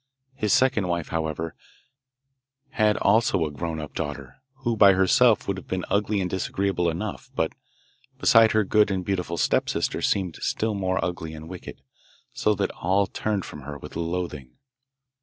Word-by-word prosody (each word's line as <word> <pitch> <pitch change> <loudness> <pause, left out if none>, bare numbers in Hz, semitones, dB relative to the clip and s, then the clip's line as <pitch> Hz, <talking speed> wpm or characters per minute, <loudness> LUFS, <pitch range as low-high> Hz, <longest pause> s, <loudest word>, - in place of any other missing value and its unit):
His 110 -6 -1
second 125 -7 +3
wife, 85 -2 -2
however, 80 0 -3 1.2
had 105 -4 +2
also 100 -4 +3
a 75 - -4
grown 80 +2 -4
up 75 -1 -7
daughter, 70 -3 -5 0.3
who 120 -2 +1
by 100 -2 +7
herself 110 +5 +4
would 100 -1 -1
have 95 - -10
been 95 -1 -2
ugly 105 0 +1
and 95 - 0
disagreeable 95 -1 -1
enough, 90 +5 -5
but - - 0 0.6
beside 115 -1 +5
her 110 0 +3
good 105 +1 +3
and 95 -2 -2
beautiful 90 -3 -2
stepsister - - 0
seemed 95 -5 0
still 110 0 -1
more 95 -2 0
ugly 80 -3 -5
and 80 +1 -9
wicked, 90 -6 -9 0.5
so 105 - +1
that - - -1
all 95 +3 +1
turned 105 -2 -2
from 75 - -9
her 75 +2 -7
with - - -11
loathing. 85 -5 -4
95 Hz, 160 wpm, -25 LUFS, 80-105 Hz, 1.2 s, by